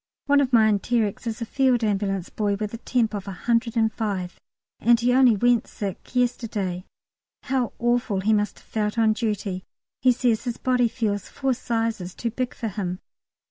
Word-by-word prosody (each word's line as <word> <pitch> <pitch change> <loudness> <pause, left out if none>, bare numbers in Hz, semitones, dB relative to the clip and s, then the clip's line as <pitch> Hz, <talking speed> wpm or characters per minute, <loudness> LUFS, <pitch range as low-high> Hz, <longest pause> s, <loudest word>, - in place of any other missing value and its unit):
One 285 0 +4
of 265 -2 0
my 225 -3 +6
enterics 215 +1 0
is 230 +1 -3
a - - -4
Field 255 0 +2
Ambulance 195 -3 -1
boy, 205 -2 0
with 210 +1 -4
a 230 - -5
temp. 235 -3 0
of 200 -1 -5
105, 220 -3 -1 0.4
and 235 +1 +4
he 245 +1 +2
only 255 -3 +6
"went 240 +2 +2
sick" 200 +4 -6
yesterday. 215 -7 -1 0.6
How 260 -3 -1
awful 240 -4 +1
he 215 +3 +2
must 210 0 0
have - - -20
felt 210 0 -2
on 220 -1 +4
duty. 205 -5 -2 0.4
He 255 - +5
says 240 -1 +1
his 240 -2 -3
body 250 -2 +2
feels 215 -4 -2
"four 270 -1 0
sizes 225 -6 -2
too 235 - -3
big 250 +2 -3
for 225 - -3
him." 180 -2 -4
225 Hz, 175 wpm, -24 LUFS, 205-245 Hz, 0.6 s, my